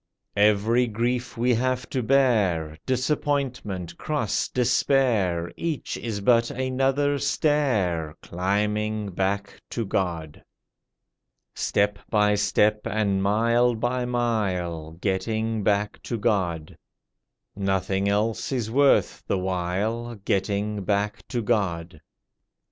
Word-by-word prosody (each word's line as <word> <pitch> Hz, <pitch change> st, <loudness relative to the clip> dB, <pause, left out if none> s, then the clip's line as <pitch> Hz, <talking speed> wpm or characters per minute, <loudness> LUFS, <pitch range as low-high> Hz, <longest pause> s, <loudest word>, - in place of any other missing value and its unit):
Every 105 Hz, +4 st, +3 dB
grief 120 Hz, +3 st, -2 dB
we 125 Hz, +2 st, +2 dB
have 130 Hz, +1 st, 0 dB
to 130 Hz, -, 0 dB
bear 110 Hz, -, +2 dB
Disappointment, 130 Hz, -, -1 dB
cross, 145 Hz, -9 st, -1 dB
despair 120 Hz, -8 st, +1 dB
Each 165 Hz, -4 st, -3 dB
is 110 Hz, -4 st, -4 dB
but 115 Hz, +2 st, +4 dB
another 135 Hz, +2 st, 0 dB
stair 105 Hz, -, +1 dB
Climbing 105 Hz, +3 st, -1 dB
back 100 Hz, +2 st, -2 dB
to 115 Hz, -, -3 dB
God. 85 Hz, -6 st, -3 dB, 1.1 s
Step 100 Hz, 0 st, 0 dB
by 105 Hz, -1 st, +3 dB
step 105 Hz, +1 st, +2 dB
and 100 Hz, -2 st, 0 dB
mile 115 Hz, +4 st, +3 dB
by 125 Hz, +3 st, -1 dB
mile— 95 Hz, -10 st, -1 dB
Getting 110 Hz, +4 st, -1 dB
back 105 Hz, +1 st, 0 dB
to 120 Hz, -, -3 dB
God; 90 Hz, -8 st, -1 dB, 0.8 s
Nothing 95 Hz, 0 st, 0 dB
else 105 Hz, +5 st, 0 dB
is 120 Hz, -4 st, -2 dB
worth 140 Hz, +2 st, +3 dB
the -, -, +1 dB
while— 95 Hz, +6 st, -2 dB
Getting 100 Hz, +1 st, -1 dB
back 100 Hz, +2 st, -1 dB
to 120 Hz, -2 st, -2 dB
God. 90 Hz, -8 st, -1 dB
105 Hz, 105 wpm, -25 LUFS, 95-120 Hz, 1.1 s, but